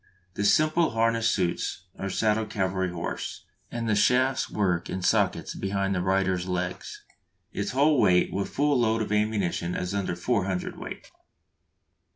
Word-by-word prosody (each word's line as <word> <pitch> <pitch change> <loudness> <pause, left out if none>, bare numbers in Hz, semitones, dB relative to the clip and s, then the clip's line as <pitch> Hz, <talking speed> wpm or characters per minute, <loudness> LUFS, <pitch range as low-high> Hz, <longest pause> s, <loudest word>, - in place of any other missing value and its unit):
The 100 - -3
simple 155 +9 +3
harness 115 0 +2
suits 90 -3 -1
any 95 - -4
saddled 110 +2 0
cavalry 95 -1 -1
horse, 85 -1 -5 0.2
and 120 -1 -4
the 110 - +2
shafts 130 +5 +2
work 90 -5 0
in 95 -1 -4
sockets - - +1
behind 100 0 -1
the 90 - 0
rider's 95 -1 +1
legs. 90 0 -4 0.5
Its - - -2
whole 145 +1 +4
weight 90 -1 +3
with 100 0 -2
full 145 -1 +1
load 115 -1 +2
of 105 - -6
ammunition 105 -5 0
is 90 +2 -3
under 100 -3 -1
four 100 +3 0
hundredweight. 95 -2 -5
100 Hz, 150 wpm, -26 LUFS, 90-115 Hz, 0.5 s, whole